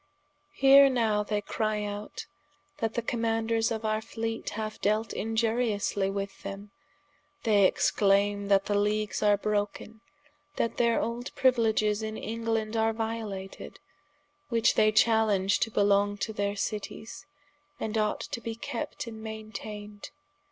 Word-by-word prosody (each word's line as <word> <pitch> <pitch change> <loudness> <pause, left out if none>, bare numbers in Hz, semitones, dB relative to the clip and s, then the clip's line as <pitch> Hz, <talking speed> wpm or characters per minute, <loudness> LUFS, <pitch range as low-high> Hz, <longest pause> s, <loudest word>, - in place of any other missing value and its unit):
Here 275 +1 +7
now 225 -5 +1
they 210 0 -1
cry 215 0 -1
out, 205 0 -6 0.5
that 225 -1 -1
the 235 - -1
Commaunders 225 -1 0
of 220 -1 -3
our 215 0 0
Fleete 225 0 -4
haue 215 0 -4
delt 215 +2 +1
iniuriously 220 -3 0
with 200 0 -5
them, 200 +1 -7 0.7
they 205 -4 +4
exclaime 200 +1 +2
that 195 0 +3
the 205 - -1
leagues 210 0 0
are 205 -1 +4
broken, 210 +1 -3 0.5
that 230 - -1
their 235 -1 +3
old 235 +2 -3
priuiledges 220 -4 +2
in 215 0 -4
England 225 -1 -2
are 225 0 +2
violated, 220 -4 -5 0.7
which 230 -2 +3
they 215 0 +4
chalenge 215 -3 +3
to - - +1
belong 205 -1 +2
to 220 +3 -3
their 200 -1 -1
Cities, 210 +2 -5 0.5
and 220 0 -3
ought 215 -1 0
to 235 - -5
be 230 -1 -4
kept 235 +1 -5
and 220 -2 -8
mainteined. 215 -1 -7
215 Hz, 135 wpm, -28 LUFS, 205-225 Hz, 0.7 s, Here